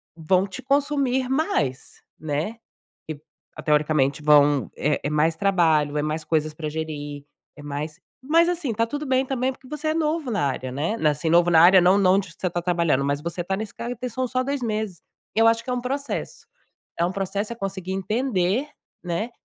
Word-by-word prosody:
vão 180 +4 +2
te 190 -2 -8
consumir 275 -2 +1
mais, 145 - -1 0.2
né? 155 +9 -3 0.5
Que 155 -2 -6 0.4
ah, - - -7
teoricamente 150 -2 +1
vão 145 -2 +4
é 150 0 0
é 145 - -1
mais 155 +2 +2
trabalho, 160 -6 +2
é - - 0
mais 155 +1 -2
coisas 155 -1 0
pra 155 -1 -5
gerir, 145 -2 -5 0.3
é 150 - -11
mais 150 +3 -5 0.2
mas 330 +5 +4
assim, 335 -8 -1
tá 230 +2 0
tudo 290 +5 -4
bem 260 -1 +1
também, 260 0 -1
porque 260 0 -17
você 300 +1 -3
é 310 - +1
novo 315 -3 -1
na 200 -10 0
área, 130 -1 -3
né? 155 - -1
Na 155 -9 +2
assim, 150 +3 -2
novo 175 +1 +4
na 160 - +6
área 185 +3 +8
não 185 +3 +5
não 190 0 +4
de 185 -4 -4
você 185 - 0
tá 175 0 -3
trabalhando, 170 -6 +1
mas 140 +1 0
você 170 +2 -4
tá 190 +2 -1
nesse 215 +1 -6
cargo 240 +1 -5
tem 250 +2 -4
são 255 +2 -2
só 255 +1 0
2 275 0 -3
meses. 215 -6 -3 0.3
Eu 225 +1 +4
acho 230 0 +2
que - - -20
é - - 0
um 250 - -1
processo. 275 +2 -4 0.5
É 170 - +2
um 175 - 0
processo, 200 +3 -3
é - - -7
conseguir 190 -3 -5
entender, 210 +3 0 0.3
né, 180 +7 -3
185 Hz, 205 wpm, -24 LUFS, 155-250 Hz, 0.5 s, área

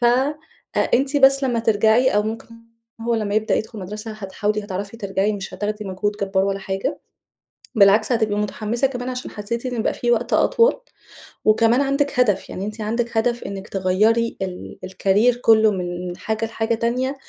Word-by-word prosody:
ف 240 - 0 0.9
أنتِ 275 +3 +1
بس 275 0 +5
لما 240 -3 0
ترجعي 225 +3 +3
أو 210 - +3
ممكن 220 +1 -5 0.5
هو 235 +1 0
لما 210 -2 -1
يبدأ 215 0 +1
يدخل 220 0 -3
المدرسة 210 +4 -6
هتحاولي 210 +1 -3
هتعرفي 200 +2 -5
ترجعي 200 0 -1
مش 195 -2 -6
هتاخدي 210 +2 -3
مجهود 195 +2 -2
جبار 195 -1 +1
ولا 195 0 -1
حاجة، 195 0 -3 0.8
بالعكس 210 +3 +5
هتبقى 220 -3 +1
متحمِّسة 215 +4 -1
كمان 250 -1 -5
عشان 255 0 -5
حسيتِ 235 +4 -4
إن 240 -3 -2
بقى - - 0
في 240 - -1
وقت 240 0 0
أطول 470 +2 +3 0.7
وكمان 230 +4 +4
عندِك 275 -1 0
هدف، 210 -6 +2
يعني 195 - -5
أنتِ 215 +1 -6
عندِك 230 +2 -2
هدف 240 +1 +1
إنِك 195 0 -6
تغيّري 210 +5 +1
ال 185 -1 -6
الcareer 200 +6 +2
كله 220 -1 +5
من 180 -1 -4
حاجة 220 0 -2
لحاجة 225 0 -1
تانية 250 +4 -1
220 Hz, 165 wpm, -21 LUFS, 200-235 Hz, 0.9 s, بس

